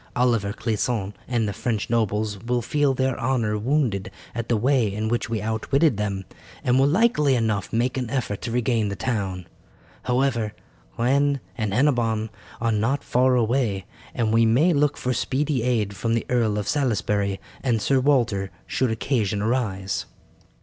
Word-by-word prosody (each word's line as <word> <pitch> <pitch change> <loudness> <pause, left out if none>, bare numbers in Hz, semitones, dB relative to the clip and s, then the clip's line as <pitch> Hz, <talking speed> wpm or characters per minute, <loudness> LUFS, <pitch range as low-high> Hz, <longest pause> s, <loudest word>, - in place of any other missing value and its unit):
Oliver 115 -5 +2
Clisson 110 -2 -2
and 120 -3 0
the 100 - -2
French 110 -2 -2
nobles 105 -3 -1
will 120 0 0
feel 140 +2 +1
their 130 -1 0
honour 120 -4 0
wounded 115 -4 0 0.2
at 115 0 -4
the 120 - +3
way 125 -2 +2
in 110 +2 -2
which 120 0 -1
we 115 -2 -2
outwitted 115 +5 +1
them, 100 -2 -2 0.4
and 125 +1 +3
will 135 - +5
likely 150 - +3
enough 110 -5 -1
make 120 +3 0
an 125 -3 -3
effort 120 -6 -2
to 120 - -4
regain 115 -3 +1
the 100 - -3
town. 95 -7 -2 0.6
However, 125 -4 +1 0.4
Rennes 140 +4 +2 0.2
and 110 -5 -2
Hennebon 115 -3 +1 0.3
are 115 0 +1
not 115 +7 0
far 125 +1 +3
away, 115 -5 +1 0.3
and 110 -2 +1
we 115 0 +5
may 130 +11 +4
look 145 0 +2
for 125 - -1
speedy 135 +2 0
aid 110 -5 0
from 115 +3 0
the 115 - -1
Earl 115 -4 +1
of 105 0 -3
Salisbury 105 -7 0 0.2
and 120 -4 +1
Sir 135 +5 +2
Walter 120 -8 +2 0.2
should 130 - 0
occasion 110 -3 0
arise." 100 -6 -1
115 Hz, 165 wpm, -24 LUFS, 105-130 Hz, 0.6 s, will